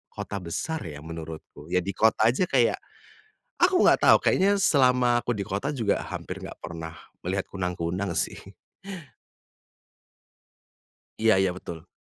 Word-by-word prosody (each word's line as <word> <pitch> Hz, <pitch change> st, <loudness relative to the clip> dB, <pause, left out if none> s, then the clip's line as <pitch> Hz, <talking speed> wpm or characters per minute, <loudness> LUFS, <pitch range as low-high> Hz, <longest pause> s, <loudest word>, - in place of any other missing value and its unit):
kota 100 Hz, -, -5 dB
besar 150 Hz, -, -3 dB
ya 75 Hz, -1 st, -8 dB
menurutku, 80 Hz, -2 st, -9 dB
ya 90 Hz, -, +4 dB
di 100 Hz, -, -3 dB
kota 110 Hz, 0 st, +4 dB
aja 135 Hz, -, 0 dB
kayak, 125 Hz, -4 st, +2 dB, 0.8 s
aku 365 Hz, +1 st, +5 dB
nggak -, -, +5 dB
tahu -, -, +8 dB
kayaknya 200 Hz, +2 st, +3 dB
selama 125 Hz, -5 st, +4 dB
aku 120 Hz, -, -1 dB
di 100 Hz, -, -3 dB
kota 105 Hz, +9 st, -2 dB
juga 110 Hz, -5 st, 0 dB
hampir -, -, -6 dB
nggak -, -, -7 dB
pernah 80 Hz, 0 st, -7 dB, 0.3 s
melihat 95 Hz, +2 st, -2 dB
kunang-kunang 90 Hz, 0 st, -2 dB
sih. -, -, -3 dB, 2.6 s
Iya 110 Hz, 0 st, +4 dB
iya 95 Hz, -2 st, +2 dB
betul. 80 Hz, -3 st, -9 dB
100 Hz, 135 wpm, -26 LUFS, 85-125 Hz, 2.6 s, tahu